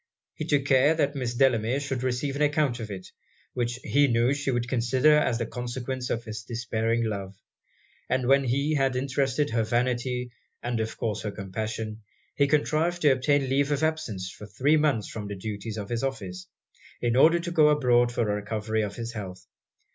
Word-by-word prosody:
He 155 - -5
took 145 -3 +1
care 140 +3 +4
that 145 -3 +1
Miss 125 -4 -3
Delamere 125 -1 +2
should 135 -3 -3
receive 130 +2 -1
an 145 - -3
account 145 -4 +2
of 110 -2 -6
it, 95 -2 -7 0.4
which 120 -1 -1
he 145 +1 +3
knew 120 +1 +2
she 140 -1 -2
would 120 -2 0
consider 130 +4 +3
as 150 -6 +2
the 115 - -2
consequence 125 +2 -4
of 115 - -1
his 110 -2 -6
despairing 115 0 -1
love; 100 -3 -4 0.7
and 130 -1 +1
when 135 +1 +5
he 140 +5 +1
had 135 -3 +1
interested 135 +1 0
her 115 0 +1
vanity 125 +2 -1 0.3
and 120 -1 -1
of 110 0 -3
course 110 -4 -2
her 105 - -3
compassion, 110 +3 -5 0.3
he 140 - +2
contrived 155 +4 +1
to 145 - +6
obtain 135 +1 +2
leave 140 +2 +1
of 145 +1 0
absence 110 - -2
for 105 - -11
three 130 +9 +2
months 150 -8 +1
from 105 -2 -6
the 100 - -5
duties 105 +2 -5
of 100 -2 -5
his 120 -1 -1
office, 95 -9 -4 0.5
in 120 -1 0
order 165 +6 +6
to 175 0 -4
go 155 -3 +5
abroad 120 -5 +3
for 120 -1 0
the 105 - 0
recovery 105 +1 -2
of 100 -1 -3
his 115 0 -5
health. 95 -4 -7
125 Hz, 195 wpm, -27 LUFS, 110-140 Hz, 0.7 s, to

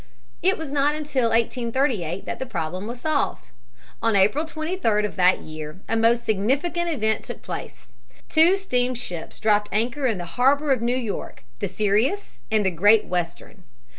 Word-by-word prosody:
It 380 +2 +3
was 320 -3 -6
not 290 +1 +2
until 285 -6 0
1838 230 - 0
that - - -5
the 260 - -4
problem 180 -1 -4
was 240 +1 -7
solved. 310 -3 -1 0.5
On 225 -2 +2
April 205 +11 +3
23d 310 - 0
of 210 - -5
that 185 0 +4
year 155 +2 -8
a - - 0
most 230 +1 +3
significant 280 - 0
event 220 -8 0
took - - -8
place. - - -7 0.4
Two 335 +4 +5
steamships 245 - -3
dropped 210 -1 +2
anchor 245 +6 0
in 225 -5 0
the 175 - -5
harbor 275 - +2
of 255 -4 +2
New 240 +2 +1
York, 230 - -5 0.2
the 200 - -1
Sirius 215 - 0
and 215 -2 +2
the 190 - +2
Great 205 +6 +4
Western. 175 -2 -4
230 Hz, 165 wpm, -24 LUFS, 200-285 Hz, 0.5 s, Two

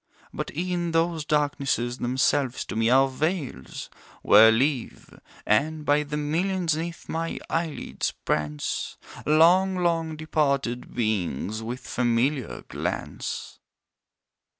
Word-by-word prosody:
But - - -4
e'en 175 -1 -1
those 165 -1 +1
darknesses 140 -5 0
themselves 130 +1 +1
to - - -6
me 115 +1 +2
are 135 +2 +5
veils, 140 - -3 0.4
Where 110 +2 +8
live 130 +2 -1 0.3
and, 150 +8 +1
by 145 +1 +4
the 150 0 -4
millions 165 +3 0
'neath 170 +1 -5
my 165 +1 -3
eyelids 165 -2 -2
prance, 75 -1 -3 0.3
Long, 175 +5 +5
long 165 -3 0
departed 140 -6 -1
Beings 110 - -1
with 120 +3 -5
familiar 125 +2 0
glance. - - -4
145 Hz, 105 wpm, -26 LUFS, 120-165 Hz, 0.4 s, Where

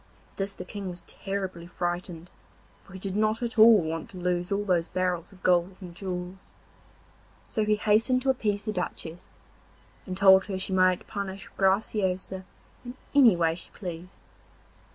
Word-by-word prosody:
At - - -30
this 195 0 -2
the 180 - -8
King 195 0 -6
was 175 0 -8
terribly 190 -3 -5
frightened, 175 -1 -4 0.5
for 195 - -16
he - - -7
did 190 0 -4
not 215 +2 +1
at 230 -1 -2
all 220 -1 +9
want 160 0 -4
to 190 - -10
lose 180 +1 -1
all 200 +1 0
those 175 -3 +1
barrels 180 0 -2
of 190 -2 -18
gold 180 +1 +2
and 180 -3 -9
jewels. 180 0 -6 0.9
So 215 -2 -1
he 210 0 +3
hastened 225 +4 +2
to 270 - +4
appease 210 -5 -2
the 215 - -2
Duchess, 175 -2 -5 0.8
and 185 0 -4
told 190 -1 +7
her 195 -2 -3
she 190 0 -1
might 185 -1 +3
punish 195 -1 -6
Graciosa 190 -1 0 0.4
in 245 0 -8 0.2
any 255 -9 +7
way 165 -1 +2
she 170 - -8
pleased. 175 -1 -8
190 Hz, 170 wpm, -27 LUFS, 180-205 Hz, 0.9 s, all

